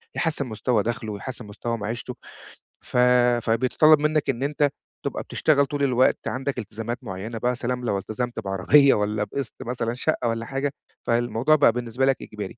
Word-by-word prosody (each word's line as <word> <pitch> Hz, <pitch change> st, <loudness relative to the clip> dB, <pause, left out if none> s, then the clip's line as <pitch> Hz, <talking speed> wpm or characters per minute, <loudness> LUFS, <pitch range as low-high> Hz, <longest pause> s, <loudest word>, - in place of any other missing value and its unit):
يحسّن 155 Hz, -4 st, 0 dB
مستوى 110 Hz, 0 st, 0 dB
دخلُه، 115 Hz, -1 st, -3 dB
ويحسّن 125 Hz, +4 st, -7 dB
مستوى 115 Hz, +3 st, -4 dB
معيشتُه. 115 Hz, +4 st, -5 dB, 0.7 s
ف -, -, -4 dB, 0.5 s
فبيتطلَّب 130 Hz, +7 st, +4 dB
منّك 150 Hz, -1 st, +1 dB
إن 130 Hz, -1 st, -1 dB
أنت 145 Hz, 0 st, +1 dB, 0.4 s
تبقى -, -, -3 dB
بتشتغل 140 Hz, -2 st, +2 dB
طول 140 Hz, +1 st, -3 dB
الوقت، 130 Hz, -1 st, +3 dB
عندَك 130 Hz, +3 st, -3 dB
التزامات 115 Hz, +2 st, -5 dB
معيّنة 110 Hz, +2 st, -6 dB
بقى 120 Hz, -, 0 dB
يا 125 Hz, -, 0 dB
سلام 125 Hz, 0 st, -3 dB
لو 100 Hz, -, 0 dB
التزمت 120 Hz, +5 st, -4 dB
بعربية 115 Hz, +8 st, +4 dB
والّا 105 Hz, 0 st, 0 dB
بقِسط 120 Hz, +5 st, -4 dB
مثلًا 120 Hz, -1 st, -2 dB
شقّة 125 Hz, 0 st, -1 dB
والّا 115 Hz, 0 st, -2 dB
حاجة، 135 Hz, +3 st, -2 dB, 0.4 s
فالموضوع 120 Hz, +5 st, +2 dB
بقى 145 Hz, -, +5 dB
بالنسبة 125 Hz, +2 st, -1 dB
لك 135 Hz, -1 st, +1 dB
إجباري. 105 Hz, 0 st, -7 dB
120 Hz, 165 wpm, -24 LUFS, 110-135 Hz, 0.7 s, بقى